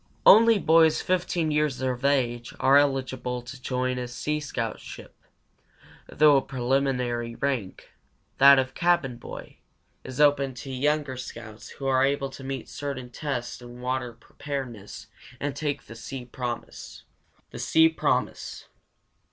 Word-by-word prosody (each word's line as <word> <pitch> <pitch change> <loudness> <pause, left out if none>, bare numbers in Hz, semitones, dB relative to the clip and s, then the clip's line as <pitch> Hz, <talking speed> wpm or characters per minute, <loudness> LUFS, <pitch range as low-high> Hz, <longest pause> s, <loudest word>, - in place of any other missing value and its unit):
Only 230 0 +8
boys 160 -3 +4
over 185 0 +1
15 170 -3 -2
years 150 -3 0
of 130 -1 -2
age 125 -4 0
are 135 +1 +5
eligible 130 -3 +1
to 130 +2 -10
join 125 0 -1
a 125 - -4
sea 150 +5 -2
scout 120 -6 -4
ship, - - -11 0.9
though 150 -1 +5
a - - +3
preliminary 125 -3 -1
rank, 125 -9 -3 0.5
that 140 0 +9
of 130 0 0
Cabin 170 -8 +1
Boy, - - -10 0.5
is 130 - -8
open 140 -3 +3
to 135 +3 -8
younger 145 0 0
scouts 115 -3 -9
who 135 - -6
are 130 -1 +3
able 140 0 0
to 135 - -10
meet 135 -2 -5
certain 130 -4 -6
tests 125 -5 -4
in 120 0 -11
"water 125 -1 -2
preparedness" 120 -3 -7 0.3
and 145 -1 -3
take 145 -1 -3
the - - -11
Sea 125 +2 -7
Promise. 120 -1 -6 0.5
THE - - -8
SEA 160 0 +4
PROMISE. 160 - -2
135 Hz, 145 wpm, -26 LUFS, 125-145 Hz, 0.9 s, that